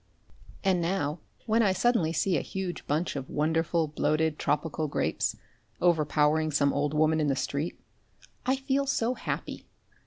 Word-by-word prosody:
And 190 -3 +2
now, 165 -3 -1 0.3
when 225 0 +3
I 200 -4 +3
suddenly 200 -6 +2
see 180 +2 +1
a 145 - +1
huge 190 -2 -5
bunch 155 +4 0
of 135 -2 -5
wonderful 160 +2 +1
bloated 155 +1 0
tropical 155 +1 -1
grapes, 145 - -1 0.4
overpowering 155 -2 +2
some 140 -1 +2
old 145 +1 0
woman 155 +1 +3
in 150 - +1
the 135 - +2
street, 140 +4 -3 0.6
I 260 +2 +2
feel 270 +1 0
so 245 -3 +1
happy! - - -5
160 Hz, 150 wpm, -28 LUFS, 150-190 Hz, 0.6 s, when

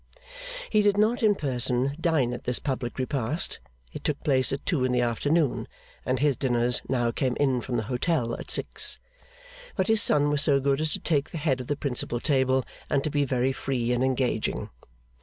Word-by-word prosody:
He 215 - +4
did 205 -1 +2
not 220 +4 +2
in 215 -2 +4
person 130 -2 0
dine 150 -8 +1
at 120 - -7
this 125 - 0
public 130 -4 -3
repast 130 +3 -1 0.3
(it - - -7
took 150 -1 -2
place 130 -4 +2
at 135 +1 -4
two 160 -9 0
in 130 - +1
the 125 -1 +2
afternoon, 145 +6 0 0.4
and 130 - +1
his 145 +1 +2
dinners 120 -2 +1
now 120 -3 +1
came 130 0 -1
in 135 -4 +1
from 120 0 -3
the 110 - -1
hotel 125 - -1
at - - -9
six), - - +1 0.8
but 190 - +1
his 220 -1 +4
son 145 0 +4
was 145 -1 +2
so 140 -2 +4
good 135 +1 +1
as 155 -1 0
to - - -3
take 150 -3 0
the - - -6
head 140 -4 0
of 125 - -8
the 145 - 0
principal 125 -4 -1
table, 130 -1 +2 0.2
and 135 - +1
to 155 - -2
be 145 0 +1
very 130 0 +1
free 125 -3 -2
and 125 +1 +1
engaging. 130 -1 -1
135 Hz, 200 wpm, -26 LUFS, 125-150 Hz, 0.8 s, He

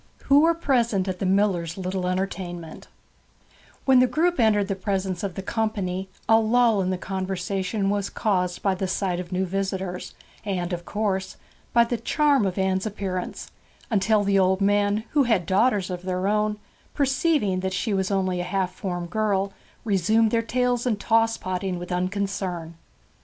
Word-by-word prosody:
WHO 280 +1 +5
WERE 330 +2 +4
PRESENT 235 - +1
AT 185 -1 -3
THE 190 - 0
MILLER'S 185 -4 +1
LITTLE 185 -1 -2
ENTERTAINMENT 180 -3 -4 1.0
When 265 -2 +6
the 255 - +5
group 330 +7 +1
entered 210 -3 +3
the 200 - -1
presence 190 -2 -2
of 195 -3 -4
the 195 - -5
company 195 -4 -2 0.2
a 225 0 +6
lull 225 -1 +3
in 185 - -1
the 185 - -1
conversation 190 +2 -2
was 205 -1 -1
caused 180 -4 -1
by 195 - +2
the 190 +1 -2
sight 185 -1 -1
of 180 0 -7
new 185 +1 0
visitors, 190 -1 -3 0.3
and 185 -3 -2
(of 175 0 -5
course) 195 -3 -2 0.3
by 235 - +5
the 235 +1 -2
charm 285 -5 +2
of 185 - -4
Anne's 190 +1 0
appearance; 190 -3 -4 0.4
until 210 0 +3
the 200 -1 +3
old 190 0 +3
men, 205 +1 +2
who 290 -3 +3
had 220 -7 +2
daughters 200 -1 +2
of 180 -1 -4
their 185 +1 -2
own, 210 0 +1 0.4
perceiving 275 - +1
that 190 0 -2
she 205 +4 -1
was 190 -1 0
only 185 -2 0
a - - -1
half 185 0 -1
formed 175 -3 -4
girl, 200 -2 0 0.3
resumed 215 +2 +3
their 230 - +2
tales 245 +1 0
and 220 -4 0
toss 225 +1 +2
potting 185 0 -3
with 175 +1 -7
unconcern. 185 -2 -2
195 Hz, 170 wpm, -24 LUFS, 185-220 Hz, 1.0 s, When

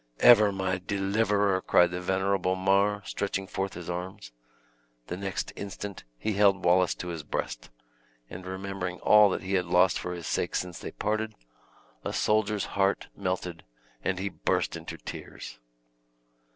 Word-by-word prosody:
"Ever 110 -4 +8
my 95 -1 -1
deliverer!" 100 0 +1
cried 90 -1 +4
the 90 0 -3
venerable 95 0 +1
Mar, 100 +2 +2
stretching 100 -1 -2
forth 95 0 -3
his 90 - -8
arms. 90 -8 -5 0.7
The 90 - -4
next 95 +1 -4
instant 100 0 -7
he 110 - -1
held 100 -2 +3
Wallace 90 0 +4
to 90 - -6
his 85 -2 -4
breast; - - -4 0.6
and 90 +8 -9
remembering 95 -1 -4
all 105 -1 +7
that 95 - -2
he 95 +1 -3
had 90 -2 +1
lost 90 +1 +4
for 90 - -4
his 85 -2 -7
sake - - -1
since 90 -1 -3
they - - -6
parted, 110 +1 -2 0.7
a - - -3
soldier's 105 -1 +1
heart 100 0 +1
melted, 90 -3 -3 0.4
and 95 - 0
he 100 +2 -2
burst - - -1
into - - -7
tears. - - -9
95 Hz, 150 wpm, -28 LUFS, 90-100 Hz, 0.7 s, Ever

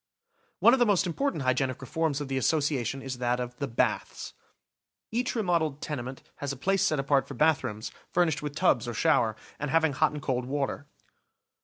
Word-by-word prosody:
One 235 - +6
of 265 - +3
the 240 - +5
most 200 -3 +3
important 180 - -1
hygienic 130 0 0
reforms 150 +2 -1
of 145 - -4
the 135 - -2
As 130 - +2
sociation 135 -4 0
is 130 -2 -5
that 125 0 0
of 125 0 -4
the 140 - -2
baths. 115 - -1 0.8
Each 245 +3 -1
remodeled 170 - 0
tenement 130 -4 -5
has 145 -1 -3
a 135 - -6
place 195 +7 +1
set 155 - +2
apart 135 0 +2
for 140 - -7
bathrooms, 130 -7 +1 0.2
furnished 160 -5 +1
with 145 -1 -5
tubs 120 -6 +2
or 120 - -4
shower, 110 0 +3 0.2
and 145 - -2
having 160 -1 +3
hot 155 +3 +2
and 150 - -5
cold 125 -3 -1
water. 140 +1 -2
140 Hz, 190 wpm, -28 LUFS, 130-160 Hz, 0.8 s, One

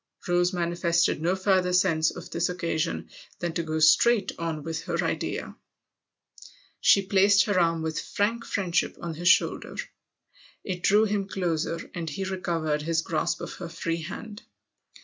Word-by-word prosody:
Rose 175 0 +2
manifested 170 -2 +1
no 175 +3 +1
further 185 -1 +2
sense 165 -4 +3
of - - -8
this 170 +1 0
occasion 170 -2 -2 0.3
than 175 -2 -3
to 170 - -1
go 160 -1 -3
straight 195 +8 +4
on 165 -3 -3
with 165 0 -4
her - - -1
idea. - - -3 1.2
She 200 -1 +5
placed 200 +1 +4
her 205 -3 +1
arm 165 -2 +1
with 160 -1 -2
frank 230 +5 -1
friendship 185 -6 -1
on 170 -1 -5
his 175 +3 -3
shoulder. 185 - +3 0.9
It 185 -3 -4
drew 210 +4 +4
him 200 -2 -1
closer, 170 -3 -2
and 170 -2 -4
he 170 +7 -4
recovered 170 -5 -1
his 165 +1 0
grasp 160 -2 -1
of - - -6
her 170 - -6
free 165 0 -3
hand. 205 +6 -8
175 Hz, 155 wpm, -26 LUFS, 165-190 Hz, 1.2 s, She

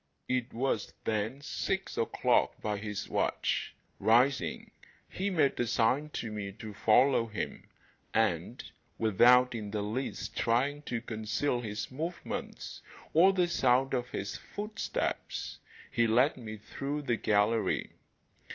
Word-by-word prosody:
It 125 -1 -1
was 120 -3 -1
then 110 +5 -1
six - - -2
o'clock - - +2
by 105 -1 -2
his 105 -1 -4
watch. - - -1 0.2
Rising, 115 - +2 0.4
he 195 +2 -2
made 155 -7 +2
a 120 - +1
sign 120 +6 +2
to 115 - -4
me 100 -2 -5
to 110 0 -8
follow 115 +3 +4
him, 110 -2 -5 0.4
and, - - 0 0.3
without 125 +4 +5
in 110 -3 -4
the 105 0 -2
least 115 +6 -4
trying 135 +5 +1
to 115 -2 -1
conceal 115 +4 -1
his 105 -1 -4
movements 165 +6 -5 0.3
or 180 +5 +7
the 180 -2 +2
sound 135 -4 +2
of 125 -1 -1
his 100 -4 -4
footsteps, 210 +1 -4 0.3
he 115 0 +3
led 125 +6 +4
me 110 -4 -7
through 140 +7 -4
the 120 -4 +1
gallery. 105 +2 +1
120 Hz, 130 wpm, -31 LUFS, 110-135 Hz, 0.4 s, or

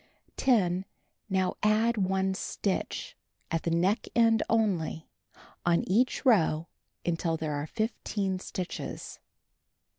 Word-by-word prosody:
10. 190 -8 +3 0.5
Now 190 -1 +1
add 220 +3 +3
1 190 -1 +1
stitch, 190 0 -3 0.4
at 165 -1 +1
the - - -1
neck 180 +6 +1
end 225 -1 +5
only, 190 -8 +1 0.6
on 170 -1 +2
each 240 +9 +2
row 170 -9 +4 0.4
until 165 -1 0
there 155 -1 -2
are 145 +1 -3
15 205 -2 -2
stitches. 185 -1 -5
190 Hz, 110 wpm, -29 LUFS, 170-220 Hz, 0.6 s, end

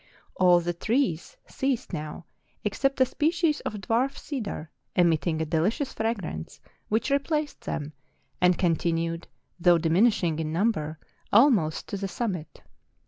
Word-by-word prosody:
All 180 -1 +5
the 175 +1 -2
trees 220 - -1
ceased 265 -5 -2
now, 155 +1 -5 0.4
except 275 +7 0
a 260 - +6
species 320 +3 +1
of 215 - -4
dwarf 230 +7 0
cedar, 210 - -5 0.2
emitting 165 -2 +2
a 160 - 0
delicious 195 - 0
fragrance, 200 - -3 0.3
which 220 +6 0
replaced 290 +2 0
them, 150 0 -4 0.5
and 180 -1 +4
con¬ 170 -3 +3
tinued, 165 0 -1 0.3
though 175 0 +5
diminishing 170 0 +2
in 155 -1 -2
number, 160 -4 0 0.3
almost 210 - +4
to 200 - -3
the 195 0 -3
summit. 185 -6 -4
190 Hz, 135 wpm, -27 LUFS, 165-245 Hz, 0.5 s, a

